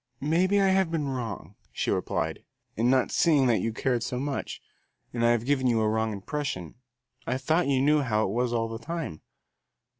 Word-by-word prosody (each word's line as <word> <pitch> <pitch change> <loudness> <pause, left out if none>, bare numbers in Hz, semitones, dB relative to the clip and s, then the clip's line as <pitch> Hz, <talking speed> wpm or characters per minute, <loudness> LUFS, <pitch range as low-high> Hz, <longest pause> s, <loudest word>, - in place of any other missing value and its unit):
"Maybe 180 +7 +2
I 195 -1 +4
have 190 -2 +2
been 160 -3 -1
wrong," 115 -8 -5 0.2
she - - -1
replied, - - -2 0.3
"in 115 +3 +2
not 130 -1 +2
seeing 150 -6 +3
that 120 -3 +3
you 115 - -1
cared 120 +1 -1
so 125 +1 -3
much, 140 +1 -4 0.5
and 120 - -2
have 120 0 +3
given 130 -1 +1
you 115 -2 +2
a 110 - +2
wrong 110 0 0
impression. 100 - -4 0.5
I 130 - 0
thought 160 +6 +1
you 135 -2 +2
knew 150 +1 +4
how 110 -5 +1
it 95 - -1
was 120 +1 0
all 115 -1 0
the 115 0 -6
time." 165 - -5
130 Hz, 190 wpm, -27 LUFS, 115-150 Hz, 0.5 s, I